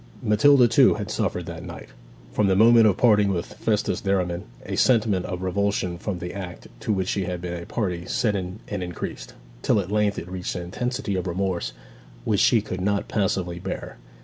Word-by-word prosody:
Matilda, 125 +4 +5
too, 125 +3 +5
had 105 0 -5
suffered 90 -6 -1
that 85 0 -7
night. 90 -1 -9 0.4
From 105 - +2
the 95 - +3
moment 115 +2 +7
of 100 - +2
parting 105 -4 +4
with 90 -3 -1
Festus 105 -2 -1
Derriman 90 -3 -1 0.2
a - - -3
sentiment 110 -7 +2
of 90 0 -4
revulsion 95 -2 -1
from 100 -2 -3
the 90 0 -6
act 90 -3 -7
to - - -2
which 95 -3 0
she 100 -2 -1
had 90 0 -3
been 85 -1 -5
a 85 - -10
party 90 -5 -2
set 105 -3 +1
in 95 +2 -5
and 105 -3 -4
increased, 90 -2 -6 0.3
till 105 - +2
at 95 0 -4
length 105 -1 +1
it 85 - -5
reached 90 0 -4
an 90 - -4
intensity 125 +5 -3
of 95 0 -2
remorse 90 -5 -2 0.5
which 100 - +1
she 115 -4 +4
could 95 -4 -5
not 100 +1 0
passively 90 -4 -1
bear. - - -6
95 Hz, 200 wpm, -24 LUFS, 90-105 Hz, 0.5 s, moment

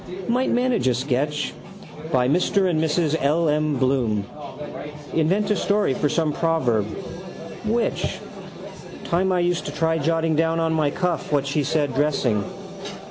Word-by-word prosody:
Might 250 +2 +1
manage 245 - +1
a 125 - +3
sketch. 145 +3 -1 0.6
By 125 -4 +3
Mr 185 +6 +2
and 160 -3 +1
Mrs 160 0 +1
L. 160 +4 +2
M. 150 0 +1
Bloom. 125 -6 +1 0.9
Invent 185 +7 +2
a - - +3
story 205 -7 +1
for 145 +3 0
some 155 0 +1
proverb. 135 -12 +1 0.8
Which? 230 +2 0 0.9
Time 185 +3 +1
I 180 -1 +2
used 175 -1 0
to - - -3
try 160 0 +1
jotting 165 +1 +1
down 165 +1 +2
on 165 0 +1
my 155 -2 +2
cuff 175 -1 -2
what 140 -2 +2
she 140 +1 0
said 145 -1 0
dressing. 130 -7 +1
155 Hz, 145 wpm, -23 LUFS, 140-175 Hz, 0.9 s, a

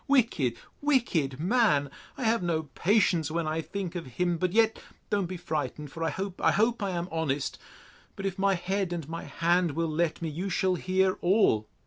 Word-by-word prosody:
Wicked, 225 - +2 0.2
wicked 190 - +1
man!—I 180 - +1
have 230 -1 +2
no 165 -3 0
patience 180 -6 +2
when 165 +1 -1
I 155 +1 -1
think 190 +1 -5
of 175 -6 -5
him!—But 175 0 +1
yet, 225 +2 +3 0.3
don't 200 -3 +1
be 185 +1 -5
frightened—for—I 155 -1 -3
hope—I 190 -1 -1
hope, 225 +2 +2
I 200 - 0
am 175 -1 -2
honest!—But 160 +5 -5
if 195 0 -2
my 195 0 +3
head 185 +1 -1
and 165 -4 -4
my 165 +1 -5
hand 170 -1 +1
will 165 +2 0
let 165 +1 0
me, 165 - -3
you 175 +6 -3
shall 185 +1 +1
hear 185 +1 +1
all. 175 - +3
175 Hz, 165 wpm, -28 LUFS, 160-195 Hz, 0.3 s, yet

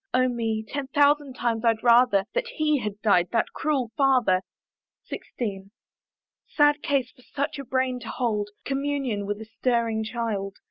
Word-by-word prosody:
Oh 255 0 +4
me! 225 -3 -2
ten 280 +1 -4
thousand 285 -1 +2
times 230 -2 -1
I'd 225 -1 +2
rather 235 -5 +5
That - - -1
he 305 -2 +2
had 210 -3 -4
died, 180 -5 +4
that 230 - +1
cruel 270 -7 -1
father! 255 -9 +3 0.7
XIV. 195 -5 -5 0.8
Sad 295 -1 +3
case 265 -3 0
for 250 - -22
such 280 +2 -4
a - - -4
brain 260 -1 -1
to 230 -2 -8
hold 210 -4 -1 0.2
Communion 275 -7 -2
with 205 0 -3
a - - -7
stirring 230 -1 0
child! 215 -4 -3
240 Hz, 155 wpm, -25 LUFS, 220-275 Hz, 0.8 s, rather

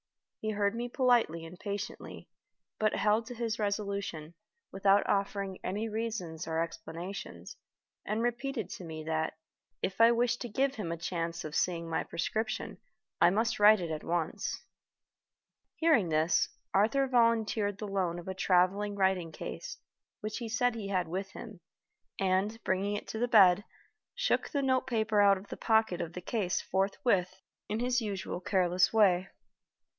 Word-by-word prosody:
He 215 - -3
heard 205 -1 +1
me 240 +1 -3
politely 240 - +2
and 175 +2 -11
patiently, 205 0 -6 0.5
but 215 -1 +2
held 215 +2 +2
to 245 - -7
his 230 -1 -2
resolution, 200 -6 -3 0.4
without 195 +1 +3
offering 200 -1 -1
any 210 +4 -2
reasons 215 -7 -4
or 160 0 -1
explanations, 165 - -6 0.5
and 215 +3 -1
repeated 240 -2 -2
to - - -7
me 160 -2 -7
that, 160 0 -2 0.5
if 190 +4 -1
I 230 +1 +8
wished 240 0 +1
to 240 - -4
give 270 +5 +1
him 205 -10 -4
a 170 - -3
chance 170 -1 -3
of 150 -1 -6
seeing 170 -2 0
my 160 - -1
prescription, 220 +6 -3 0.4
I 175 - +8
must 225 +5 0
write 210 0 +7
it 170 -2 -4
at 155 -1 -4
once. 170 -2 -2 1.1
Hearing 290 - +3
this, 155 +1 +2 0.2
Arthur 230 +8 +3
volunteered 230 -5 +2
the 210 - -5
loan 185 -4 -1
of 175 - -9
a 190 - -2
traveling 190 +3 +2
writing 190 -4 +1
case, - - -7 0.4
which 215 +2 -4
he 235 -2 -5
said 245 +1 +1
he 220 -3 -5
had 185 -2 0
with 190 +4 -3
him, 220 -6 -9 0.6
and, 195 +4 +1
bringing 195 +2 0
it 205 - -6
to 220 - -4
the 245 - +1
bed, 205 -4 +6 0.5
shook - - 0
the 285 -2 -1
note 260 -1 +1
paper 220 -4 +2
out 200 -1 +6
of 195 +2 -12
the - - -6
pocket 220 -5 +2
of 170 - -5
the 180 - -6
case 190 -2 -1
forthwith 190 -1 0 0.3
in 215 +2 -1
his 245 0 +1
usual 200 -4 -4
careless 185 0 +2
way. 195 -4 +4
200 Hz, 160 wpm, -31 LUFS, 180-225 Hz, 1.1 s, I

